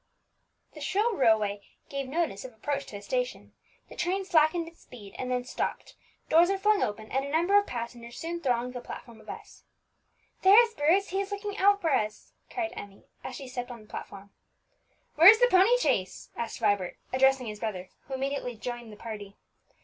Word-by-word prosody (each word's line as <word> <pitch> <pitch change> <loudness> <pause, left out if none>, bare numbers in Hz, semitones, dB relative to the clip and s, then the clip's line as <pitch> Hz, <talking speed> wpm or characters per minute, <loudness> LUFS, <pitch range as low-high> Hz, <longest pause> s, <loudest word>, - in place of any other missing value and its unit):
The 300 - -11
shrill 420 +10 +1
railway 220 - +3
whistle 200 - -27 0.2
gave 275 -1 -4
notice 310 -10 -1
of 255 -2 -9
approach 280 +5 -3
to - - -9
a 200 - -8
station; - - -3 0.3
the - - -12
train 370 +2 -1
slackened 330 -1 +3
its 330 - -15
speed, 205 -5 -13
and 255 - -3
then 250 -1 0
stopped; 255 - -4 0.3
doors 335 +3 +5
were 390 - +1
flung 420 +1 +3
open, 215 +1 -3
and 270 +1 0
a 280 - -5
number 340 +6 +2
of 410 0 +5
passengers 235 0 -6
soon 340 +1 -4
thronged 250 -2 0
the 245 - -6
platform 235 -2 -10
of - - -15
S. - - -10 0.8
"There 390 +4 +8
is 465 -1 +3
Bruce; 365 +3 +2
he 385 +2 0
is 395 +1 -6
looking 405 0 -4
out 405 +1 +4
for 325 - +1
us!" 215 -4 -2 0.2
cried 340 -3 -3
Emmie, 200 -1 -10 0.2
as 255 - -6
she 270 - -8
stepped 250 -1 -5
on 240 -2 -9
the - - -20
platform. 200 -1 -9 0.9
"Where 335 +4 +11
is 440 +1 +8
the - - +6
pony 385 +7 +6
chaise?" 185 - -1
asked 235 - -4
Vibert, 205 -4 +1 0.2
addressing 265 0 +3
his 210 -2 -6
brother, 190 -5 -4 0.2
who 270 - -4
immediately 270 -2 -3
joined 240 0 -6
the 210 - -12
party. 210 -3 -8
270 Hz, 200 wpm, -28 LUFS, 225-360 Hz, 0.9 s, Where